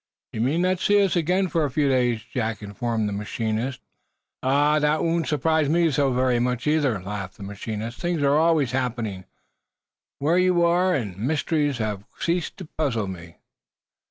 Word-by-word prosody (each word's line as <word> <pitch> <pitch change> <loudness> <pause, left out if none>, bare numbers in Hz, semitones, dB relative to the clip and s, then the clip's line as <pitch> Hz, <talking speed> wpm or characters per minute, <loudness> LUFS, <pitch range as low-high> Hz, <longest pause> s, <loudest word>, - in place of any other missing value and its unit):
"You 110 - -2
may 135 +7 +1
not 180 +1 +1
see 205 +1 +3
us 195 - +1
again, 180 +3 +1
for 165 -2 0
a 145 - 0
few 145 +2 +1
days," 125 -4 +1
Jack 115 -4 -3
informed 110 +2 -2
the 105 - -3
machinist, 110 +4 -3 0.6
in 130 - -1
winding 150 +2 +3
up. 155 - +2
"That - - -1
won't 165 -1 0
surprise 155 0 +1
me 165 0 +3
so 140 -1 +2
very 125 -1 +2
much, 125 0 -1
either," 150 -8 +2
laughed 95 0 -6
the - - -9
machinist. 110 +3 -5
"Things 175 -4 -1
are 140 0 +4
always 155 -4 +3
happening, 120 -7 -2 0.9
where 160 +6 +2
you 180 -1 +3
are, 180 +2 +3
and 105 -9 -3
mysteries 145 +2 0
have 105 -3 -3
ceased 170 0 -1
to 185 - -8
puzzle 135 -9 -2
me." 85 -3 -8
135 Hz, 180 wpm, -24 LUFS, 110-160 Hz, 0.9 s, are